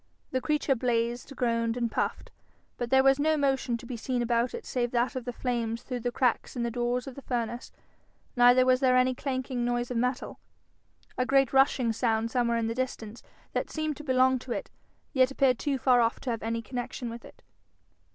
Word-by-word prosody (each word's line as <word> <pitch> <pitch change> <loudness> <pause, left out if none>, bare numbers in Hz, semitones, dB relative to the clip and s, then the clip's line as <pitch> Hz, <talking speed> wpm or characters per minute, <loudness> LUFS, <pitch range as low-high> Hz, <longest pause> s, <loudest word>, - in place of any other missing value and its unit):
The 260 - 0
creature 300 -1 +1
blazed, 240 +1 -1
groaned, 230 -1 0
and 235 -2 -1
puffed, - - -2 0.4
but 240 -1 -4
there 265 +1 +5
was 270 +1 +4
no 310 +1 +2
motion 270 -4 +1
to 230 - -12
be 245 - -5
seen 245 +1 -2
about 235 +1 0
it 470 - -8
save 245 -2 -1
that 240 +2 0
of 255 -2 -4
the 245 - -3
flames 235 -1 -2
through 250 -1 -4
the 245 +1 -2
cracks 250 +1 0
in 240 - -2
the 235 - -1
door 240 +1 0
of 255 +1 -6
the 275 - -10
furnace, 240 -2 -3 0.6
neither 245 +1 +6
was 255 0 +4
there 255 -2 +4
any 255 0 +3
clanking 260 -2 -3
noise 240 0 -1
of 245 - -1
metal. 250 +2 -2 0.8
A 255 - +2
great 270 -1 +3
rushing 265 -3 +3
sound 225 -1 0
somewhere 235 -1 +1
in 230 - 0
the 225 - -1
distance, 235 -3 -4 0.3
that - - -1
seemed 310 -1 -2
to 300 - -9
belong 260 -1 +3
to 250 - -9
it, - - -4 0.4
yet 260 -2 +4
appeared 270 -3 +2
too 280 -2 0
far 250 -1 +4
off 230 0 +1
to 255 - -2
have 230 - -3
any 230 +1 -2
connection 245 0 -5
with 235 0 -9
it. - - -16
245 Hz, 210 wpm, -28 LUFS, 235-260 Hz, 0.8 s, neither